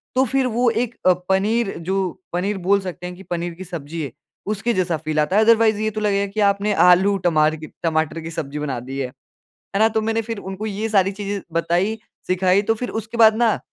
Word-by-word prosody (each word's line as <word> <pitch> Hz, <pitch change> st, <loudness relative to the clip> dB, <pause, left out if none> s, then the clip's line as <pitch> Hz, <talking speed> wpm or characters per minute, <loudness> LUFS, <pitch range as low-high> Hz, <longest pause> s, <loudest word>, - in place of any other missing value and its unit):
तो 260 Hz, -, +4 dB
फिर 265 Hz, +1 st, +1 dB
वो 240 Hz, +1 st, +2 dB
एक 235 Hz, +1 st, -1 dB
अ, 185 Hz, -, +7 dB, 0.2 s
पनीर 205 Hz, +3 st, +1 dB
जो 190 Hz, +4 st, -1 dB, 0.3 s
पनीर 195 Hz, +4 st, -1 dB
बोल 195 Hz, +2 st, +2 dB
सकते 180 Hz, -1 st, -7 dB
हैं 180 Hz, -, -7 dB
कि 190 Hz, -, -12 dB
पनीर 175 Hz, 0 st, -2 dB
की 185 Hz, -, -8 dB
सब्ज़ी 165 Hz, -2 st, -6 dB
है। 140 Hz, -5 st, -4 dB, 0.4 s
उसके 230 Hz, +4 st, -1 dB
जैसा 175 Hz, -3 st, 0 dB
फ़ील 155 Hz, 0 st, -2 dB
आता 150 Hz, +6 st, +1 dB
है। 220 Hz, -, +6 dB
अदरवाइज़ 225 Hz, -2 st, +4 dB
ये 215 Hz, -, +1 dB
तो 215 Hz, -, -4 dB
लगेगा 200 Hz, -1 st, +1 dB
कि 215 Hz, -, -3 dB
आपने 205 Hz, +1 st, -1 dB, 0.2 s
आलू 195 Hz, +3 st, +4 dB
टमार 155 Hz, -1 st, +3 dB
की 155 Hz, 0 st, -9 dB, 0.2 s
टमाटर 160 Hz, 0 st, 0 dB
की 165 Hz, +1 st, -7 dB
सब्ज़ी 150 Hz, -3 st, -5 dB
बना 140 Hz, -5 st, -3 dB
दी 135 Hz, +3 st, -6 dB
है, 130 Hz, -, -1 dB
है 130 Hz, +1 st, -21 dB, 0.5 s
ना? 220 Hz, -, +5 dB
तो 220 Hz, 0 st, 0 dB
मैंने 225 Hz, +1 st, 0 dB
फिर 225 Hz, -1 st, -5 dB
उनको 195 Hz, +2 st, -6 dB
ये 210 Hz, +2 st, -3 dB
सारी 195 Hz, -2 st, +3 dB
चीज़ें 200 Hz, 0 st, -4 dB
बताई 175 Hz, +6 st, 0 dB, 0.3 s
सिखाई 185 Hz, +2 st, +2 dB
तो 225 Hz, +2 st, +1 dB
फिर 245 Hz, +2 st, -4 dB
उसके 225 Hz, +1 st, -5 dB
बाद 220 Hz, -1 st, +7 dB
ना 230 Hz, -2 st, +2 dB
195 Hz, 225 wpm, -21 LUFS, 170-220 Hz, 0.5 s, अ